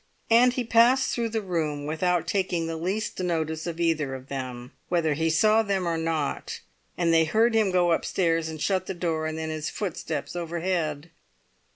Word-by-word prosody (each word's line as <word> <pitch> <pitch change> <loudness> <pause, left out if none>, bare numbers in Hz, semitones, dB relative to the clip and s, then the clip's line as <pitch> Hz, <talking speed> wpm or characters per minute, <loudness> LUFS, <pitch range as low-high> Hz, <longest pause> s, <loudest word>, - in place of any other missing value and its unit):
And 245 +2 +6
he 250 - -1
passed 235 +3 +4
through 235 -1 -1
the 220 -1 -2
room 155 -6 -2
without 170 +2 0
taking 185 -3 0
the 165 0 -3
least 190 +7 -3
notice 160 -2 -2
of 170 -1 -5
either 155 -5 0
of 130 +1 -11
them, 125 -2 -6 0.2
whether 165 -3 +1
he 160 +3 0
saw 215 +7 +4
them 195 -4 -1
or 165 - 0
not; 160 -3 -2 0.4
and 170 -2 +2
they 165 0 +5
heard 225 +8 +2
him 220 -3 +3
go 180 -2 +2
upstairs, 165 -1 +1
and 160 -1 -7
shut 185 +2 0
the 190 - -4
door, 165 -2 -1
and 155 0 -4
then 160 0 -3
his 155 -1 -3
footsteps 175 -5 -4
overhead. 170 -2 -2
170 Hz, 185 wpm, -26 LUFS, 160-190 Hz, 0.4 s, And